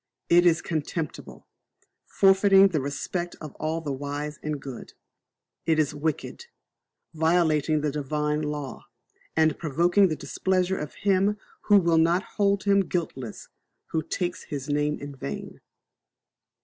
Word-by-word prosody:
It 175 +1 +6
is 165 -2 +3
contemptible, 160 -1 -4 0.6
forfeiting 195 0 +5
the 155 -6 -1
respect 170 +5 -3
of 155 -3 -8
all 160 +1 -2
the 150 -3 -4
wise 145 +2 -4
and 150 -1 -3
good. 135 -4 -9 0.7
It 160 -1 +3
is 155 -2 +1
wicked, 155 - -3 0.7
violating 160 -2 +2
the 150 -1 0
Divine 150 +1 -1
law, 150 -3 -5 0.5
and 160 -1 +2
provoking 175 +6 +3
the 160 - -2
displeasure 185 +6 -1
of 150 -1 -6
Him 200 +1 +3 0.3
who 205 - +6
will 170 -3 +3
not 170 +4 +3
hold 200 -1 +2
him 200 -1 +4
guiltless 130 - -4 0.4
who 160 - 0
takes 175 +3 -3
His 140 -3 -5
name 150 0 0
in 145 0 -8
vain. 70 - -7
155 Hz, 135 wpm, -26 LUFS, 145-180 Hz, 0.7 s, It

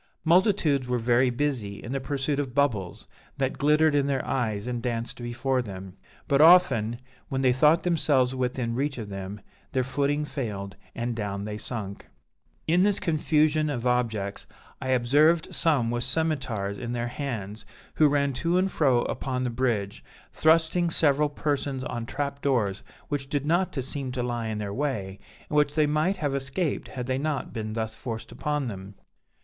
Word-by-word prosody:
Multitudes 165 - +3
were 125 0 +1
very 120 +2 +3
busy 120 -6 -1
in 120 - -6
the 135 - -1
pursuit 140 +1 -2
of 135 -3 -3
bubbles 110 -11 0 0.3
that 135 -1 -1
glittered 150 +1 +4
in 140 -1 +2
their 135 -2 -1
eyes 110 -5 -1
and 120 -1 -3
danced 120 0 -3
before 125 +2 -1
them; 95 -4 -8 0.3
but 140 -1 +3
often, 135 -10 +6 0.3
when 135 0 -1
they 125 -1 +4
thought 150 +6 +4
themselves 145 -7 +2
within 125 -2 -1
reach 140 +3 -1
of 110 -4 -6
them, 95 +1 -6 0.3
their 130 - +2
footing 145 +3 0
failed 100 -9 -5 0.2
and 120 0 -2
down 100 -2 -3
they 105 0 -4
sunk. 105 -3 -6 0.6
"In 170 +3 +3
this 205 +1 +3
confusion 155 -2 +2
of 125 -4 -3
objects, 115 -5 -1 0.3
I - - -4
observed 145 +6 +3
some 135 -8 +2
with 120 0 0
scymetars 130 -9 -1
in 120 0 -4
their 120 0 -2
hands, 115 -6 -5 0.3
who 155 - +5
ran 140 -1 +1
to 170 +7 +1
and 190 +1 +1
fro 130 -6 +3
upon 130 -1 -2
the 125 - -1
bridge, 115 -5 -1 0.3
thrusting 165 +2 +3
several 150 -2 +3
persons 145 -3 -2
on 120 -2 -4
trap 140 +1 -3
doors 110 -8 +1 0.3
which 135 -2 -3
did 145 -1 -1
not 175 +3 +1
seem 135 0 -4
to 125 -2 -2
lie 120 -2 -2
in 110 -1 -3
their 100 -1 -4
way, 100 -8 -3 0.3
and - - -4
which 150 0 +3
they 155 -1 +4
might 155 +6 +1
have 145 -5 -1
escaped 140 +4 -2
had 125 -2 -5
they 130 +1 -1
not 150 -1 -2
been 110 -2 -4
thus 110 -1 -2
forced 115 -3 -6
upon 150 -3 -2
them. 100 -2 -7
130 Hz, 175 wpm, -26 LUFS, 115-150 Hz, 0.6 s, often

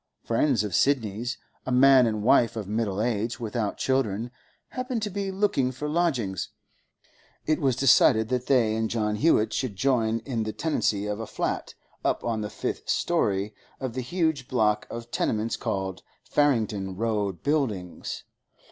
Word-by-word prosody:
Friends 115 -1 +2
of 105 - -4
Sidney's, 120 -3 +1 0.3
a 130 - -4
man 130 0 +6
and 110 -2 -2
wife 120 -1 +4
of 105 -4 -4
middle 105 -2 -1
age 120 +1 -1
without 110 -2 -2
children, 120 -3 0 0.4
happened 255 -3 -3
to 210 - -2
be 200 0 -2
looking 190 -10 +1
for 130 +4 -5
lodgings: 140 - 0 1.0
it 155 0 +1
was 135 -3 +2
decided 110 -3 +5
that 125 -1 -1
they 115 -5 +3
and 110 0 -1
John 105 -2 0
Hewett 110 -6 +3
should 125 -7 -2
join 115 -1 +1
in 120 -5 -2
the 110 0 -3
tenancy 105 -10 0
of 105 0 -3
a 115 - -5
flat, - - -3 0.3
up - - 0
on 115 -2 -1
the 105 - -3
fifth - - -4
storey 100 +2 +1 0.3
of 130 -3 -4
the 130 - -3
huge 160 -1 -1
block 105 -5 +1
of 115 0 -7
tenements 110 +1 0
called 95 -1 -3 0.2
Farringdon 110 -9 +1
Road 105 -4 -1
Buildings. 115 - -2
115 Hz, 155 wpm, -26 LUFS, 105-135 Hz, 1.0 s, man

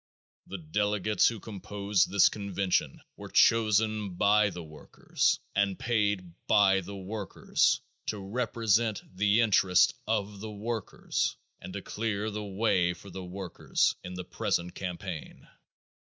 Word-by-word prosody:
The 100 - -6
delegates 105 +5 +1
who 115 -2 -1
composed 100 -1 -1
this 100 -2 +5
convention 100 -2 -1 0.2
were - - -9
chosen 110 -3 +3
by 105 +3 +4
the 90 -2 -7
workers 75 -1 -1
and 100 -1 +1
paid 105 -6 0
by 95 -2 +5
the 100 +3 -8
workers 100 +1 0 0.3
to 105 - -2
represent 110 +1 0
the 105 +4 +3
interest 95 -4 +4
of 105 -2 -1
the 110 +2 -6
workers 110 +1 -3 0.2
and - - -9
to - - -5
clear 110 -1 -2
the 105 0 -4
way 95 -3 +1
for 95 +3 -13
the 95 +1 -7
workers 90 0 -1
in 90 0 -7
the 90 0 -6
present 85 +1 -2
campaign. 90 -3 -6
100 Hz, 130 wpm, -29 LUFS, 95-105 Hz, 0.3 s, this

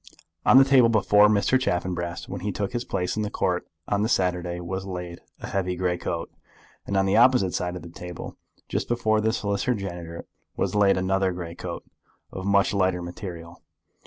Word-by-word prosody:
On - - +8
the 135 - +9
table 130 -4 +5
before 105 -1 +5
Mr. 105 +5 +3
Chaffanbrass, 90 -6 -2
when 95 -1 -6
he 105 +2 -2
took 100 +2 -3
his 120 -1 -1
place 90 -5 -2
in 110 - -1
the 105 - -2
Court 90 -4 -1 0.2
on 100 0 +1
the 110 - +1
Saturday, 90 -3 0
was 95 +2 -4
laid 90 -2 -6 0.2
a - - -5
heavy 90 -2 -1
grey 90 0 0
coat, 85 -1 -4 0.6
and 100 - 0
on 95 - +3
the 95 +2 +2
opposite 120 -6 +5
side 90 0 -2
of 90 - -7
the 85 - -9
table, 90 0 -8 0.3
just - - -2
before 110 -2 +1
the 110 +1 +2
Solicitor 100 +3 -1
General, 85 -4 -6 0.3
was - - 0
laid 100 -2 +4
another 95 0 +1
grey 85 -2 -6
coat, - - -6 0.5
of 95 +1 -5
much 100 0 +3
lighter 95 -3 +1
material. 85 -2 -8
95 Hz, 190 wpm, -25 LUFS, 90-105 Hz, 0.6 s, the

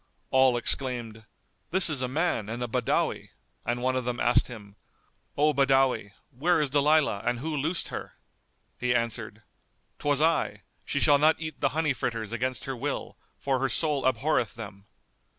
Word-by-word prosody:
All 130 -2 +5
exclaimed, 120 -3 -2 0.4
"This 190 +1 +6
is 150 -5 +1
a 130 - 0
man 130 - -1
and 120 +2 -4
a - - -2
Badawi," - - -1 0.4
and 120 +1 -1
one 130 0 +1
of 130 - -1
them 120 0 -3
asked 120 - +3
him, 105 -5 -11 0.6
"O 150 +1 +3
Badawi, 135 -6 +2 0.2
where 160 +8 +1
is 145 -3 0
Dalilah 145 -6 +3
and 120 +1 0
who 155 +5 -3
loosed 160 +5 -2
her?" - - -7 0.6
He 125 0 +1
answered, 115 -2 -3 0.6
"'Twas 145 -1 +1
I; 160 +1 +1 0.2
she - - -1
shall 145 -1 +5
not 155 +2 +5
eat 155 -3 -7
the - - +3
honey 155 -3 +2
fritters 115 -4 -3
against 125 +2 -2
her 135 - -4
will; 120 - -4 0.2
for 135 -2 -1
her 135 0 0
soul 150 -4 +1
abhorreth 125 -2 0
them." 100 -3 -10
130 Hz, 170 wpm, -27 LUFS, 120-145 Hz, 0.6 s, This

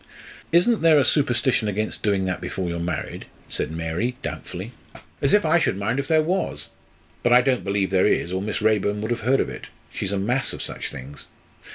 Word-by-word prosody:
"Isn't 180 +8 +4
there 160 -2 +6
a 140 - +4
superstition 130 -6 +2
against 105 +1 -2
doing 100 -2 +1
that 90 0 -2
before 95 -2 -3
you're 85 0 -3
married?" 85 +1 -4 0.2
said - - -2
Mary, 85 +10 -2
doubtfully. - - -6 0.5
"As 140 - +2
if 205 -4 +4
I 160 +2 +4
should 95 - 0
mind 110 +6 -1
if 140 - -3
there 155 0 +4
was! 185 +4 -2 0.5
But 120 - +3
I 125 - +8
don't 130 -1 +1
believe 100 -1 0
there 95 -1 +4
is, 85 - +1
or 95 - -1
Miss 105 +1 -3
Raeburn 105 -1 +2
would 110 +2 -3
have 120 - -1
heard 130 +5 +2
of - - 0
it. - - -8 0.3
She's 95 - -2
a 100 - 0
mass 120 +8 0
of - - -6
such - - -4
things. 70 +3 -10
110 Hz, 210 wpm, -23 LUFS, 95-135 Hz, 0.5 s, I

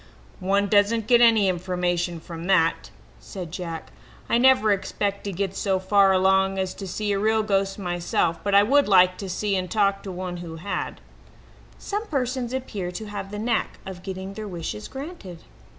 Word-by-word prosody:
"One 200 +2 +1
doesn't 210 +2 +3
get 240 +1 +5
any 225 -4 +5
information 175 -1 -1
from 165 +1 -8
that," 165 -4 +2 0.3
said 180 -5 -8
Jack. 170 -2 -6 0.4
"I 235 - +2
never 255 -4 +5
expect 200 0 -1
to 200 - -2
get 195 +1 -3
so 195 -2 0
far 195 +1 +4
along 190 +1 +3
as 190 -1 -1
to 195 - -7
see 205 +3 -2
a 200 - +1
real 220 +1 +2
ghost 195 -2 0
myself, 175 -3 -1
but 200 -1 +1
I 200 - +7
would 280 +6 +3
like 185 -2 +5
to 195 - -5
see 200 +2 -1
and 185 -1 -2
talk 200 -2 +1
to 195 - -7
one 180 0 -5
who 170 -2 -7
had." 180 +5 -4 0.8
Some 420 +2 -4
persons 255 - -2
appear 215 -8 -4
to 220 +4 -6
have 205 -1 -6
the 205 - -6
knack 225 +1 -1
of 190 -2 -8
getting 190 +1 -6
their 215 +1 -6
wishes 165 - -5
granted. 265 - -9
195 Hz, 180 wpm, -24 LUFS, 180-215 Hz, 0.8 s, I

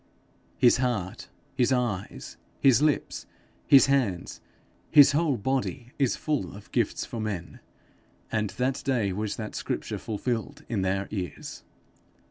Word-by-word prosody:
His 125 -2 +5
heart, 120 -8 -2 0.2
his 125 +1 +2
eyes, 120 -7 -2 0.2
his 135 -1 +5
lips, 150 -1 0 0.4
his 135 - +8
hands 125 -10 0 0.5
his 145 -2 +8
whole 145 -2 +1
body 130 +1 -2
is 135 -3 +2
full 140 - -2
of 100 - -13
gifts - - 0
for 115 - -6
men, 100 -5 -5 0.7
and 105 -2 0
that 130 +4 -1
day 120 -8 0
was 105 +2 -2
that 110 -2 -6
scripture - - -3
fulfilled 120 +6 -3
in 110 -5 -1
their 95 +1 0
ears. 90 -6 -6
120 Hz, 130 wpm, -27 LUFS, 100-135 Hz, 0.7 s, his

